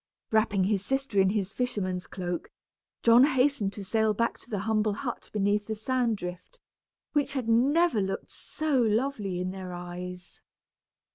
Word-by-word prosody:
Wrapping 215 Hz, -3 st, +3 dB
his 195 Hz, 0 st, +1 dB
sister 270 Hz, -4 st, 0 dB
in 190 Hz, -, +4 dB
his 195 Hz, -1 st, -1 dB
fisherman's 195 Hz, -7 st, -2 dB
cloak, 180 Hz, -2 st, -4 dB, 0.5 s
John 235 Hz, +2 st, +7 dB
hastened 260 Hz, -6 st, +2 dB
to 205 Hz, -, -7 dB
sail 220 Hz, +2 st, +1 dB
back 230 Hz, +2 st, 0 dB
to -, -, -16 dB
the 210 Hz, -, -2 dB
humble 215 Hz, +1 st, +1 dB
hut 240 Hz, +2 st, -5 dB
beneath 205 Hz, 0 st, +1 dB
the 220 Hz, -, -2 dB
sand 235 Hz, 0 st, 0 dB
drift, 180 Hz, -, -8 dB, 0.5 s
which 290 Hz, -2 st, +1 dB
had 260 Hz, -5 st, -2 dB
never 270 Hz, +3 st, +3 dB
looked 195 Hz, 0 st, -3 dB
so 305 Hz, -5 st, -1 dB
lovely 220 Hz, -4 st, 0 dB
in 180 Hz, 0 st, -2 dB
their 185 Hz, -1 st, -7 dB
eyes. 180 Hz, 0 st, -8 dB
215 Hz, 155 wpm, -28 LUFS, 190-250 Hz, 0.5 s, John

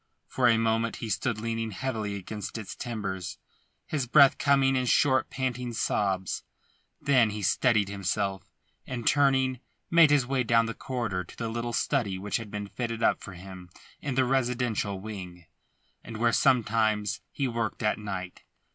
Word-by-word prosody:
For 125 Hz, -2 st, +1 dB
a 115 Hz, -1 st, +5 dB
moment 115 Hz, 0 st, +1 dB
he 115 Hz, -, -6 dB
stood 110 Hz, +2 st, -1 dB
leaning 115 Hz, 0 st, -2 dB
heavily 110 Hz, -2 st, -3 dB
against 100 Hz, +2 st, -6 dB
its 110 Hz, -3 st, -7 dB
timbers, 95 Hz, -8 st, -4 dB, 0.5 s
his 140 Hz, -5 st, -2 dB
breath 140 Hz, +2 st, +6 dB
coming 135 Hz, -1 st, +3 dB
in 130 Hz, -1 st, 0 dB
short 130 Hz, -1 st, +3 dB
panting 125 Hz, -2 st, -3 dB
sobs. 95 Hz, -4 st, -1 dB, 0.6 s
Then 125 Hz, -5 st, +4 dB
he 105 Hz, 0 st, -5 dB
steadied 110 Hz, +1 st, +3 dB
himself 100 Hz, -1 st, -2 dB, 0.4 s
and 120 Hz, -3 st, -5 dB
turning, 135 Hz, -3 st, +3 dB, 0.3 s
made 165 Hz, -2 st, +7 dB
his 145 Hz, -3 st, +4 dB
way 130 Hz, 0 st, 0 dB
down 115 Hz, 0 st, +3 dB
the 115 Hz, -, -3 dB
corridor 115 Hz, -9 st, -3 dB
to -, -, -15 dB
the 115 Hz, -1 st, -3 dB
little 120 Hz, +1 st, -3 dB
study 115 Hz, -6 st, 0 dB
which 100 Hz, +2 st, -2 dB
had 115 Hz, -3 st, -7 dB
been 105 Hz, 0 st, -4 dB
fitted 115 Hz, +2 st, -4 dB
up -, -, +3 dB
for 100 Hz, -, -9 dB
him 90 Hz, 0 st, -10 dB, 0.3 s
in 135 Hz, -3 st, -3 dB
the 130 Hz, 0 st, +3 dB
residential 125 Hz, -6 st, 0 dB
wing, 90 Hz, -4 st, -8 dB, 0.6 s
and 115 Hz, -, -7 dB
where 115 Hz, +1 st, +2 dB
sometimes 110 Hz, -5 st, +2 dB
he 140 Hz, -, -1 dB
worked 115 Hz, -1 st, -3 dB
at 105 Hz, +1 st, +1 dB
night. 95 Hz, -3 st, -6 dB
115 Hz, 165 wpm, -28 LUFS, 100-125 Hz, 0.6 s, made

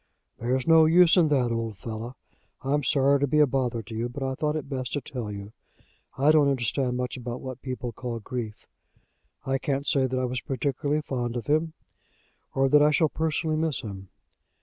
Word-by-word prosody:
"There's 125 Hz, +2 st, 0 dB
no 165 Hz, -1 st, +7 dB
use 170 Hz, +1 st, +6 dB
in 175 Hz, -4 st, +5 dB
that, 130 Hz, -5 st, +2 dB
old 115 Hz, -3 st, -3 dB
fellow. 115 Hz, +3 st, -6 dB, 0.5 s
I'm 145 Hz, +2 st, 0 dB
sorry 140 Hz, +1 st, +3 dB
to 145 Hz, -, +1 dB
be 150 Hz, -, +1 dB
a 150 Hz, -, +7 dB
bother 125 Hz, -4 st, -1 dB
to 110 Hz, 0 st, -9 dB
you, 115 Hz, +2 st, -2 dB
but 135 Hz, +3 st, -6 dB
I 130 Hz, 0 st, -1 dB
thought 150 Hz, +3 st, -1 dB
it 150 Hz, -3 st, -4 dB
best 130 Hz, -3 st, -4 dB
to 145 Hz, -, 0 dB
tell 120 Hz, -5 st, -6 dB
you. 100 Hz, 0 st, -7 dB, 0.7 s
I 140 Hz, +3 st, +5 dB
don't 150 Hz, -2 st, +5 dB
understand 125 Hz, 0 st, 0 dB
much 125 Hz, +1 st, -3 dB
about 120 Hz, 0 st, -5 dB
what 130 Hz, -2 st, -7 dB
people 125 Hz, -2 st, -4 dB
call 120 Hz, +1 st, -5 dB
grief. 110 Hz, -1 st, -6 dB, 0.8 s
I 135 Hz, 0 st, 0 dB
can't 140 Hz, +1 st, -2 dB
say 135 Hz, -3 st, +2 dB
that 130 Hz, 0 st, -2 dB
I 130 Hz, -, 0 dB
was 125 Hz, 0 st, -3 dB
particularly 145 Hz, +1 st, -1 dB
fond 120 Hz, -4 st, -3 dB
of 120 Hz, -, -5 dB
him, 155 Hz, +2 st, +1 dB, 0.8 s
or 135 Hz, 0 st, +3 dB
that 145 Hz, +2 st, +5 dB
I 150 Hz, -, +6 dB
shall 155 Hz, +1 st, +3 dB
personally 160 Hz, 0 st, -1 dB
miss 155 Hz, -4 st, 0 dB
him. 95 Hz, -3 st, -8 dB
130 Hz, 200 wpm, -26 LUFS, 120-150 Hz, 0.8 s, no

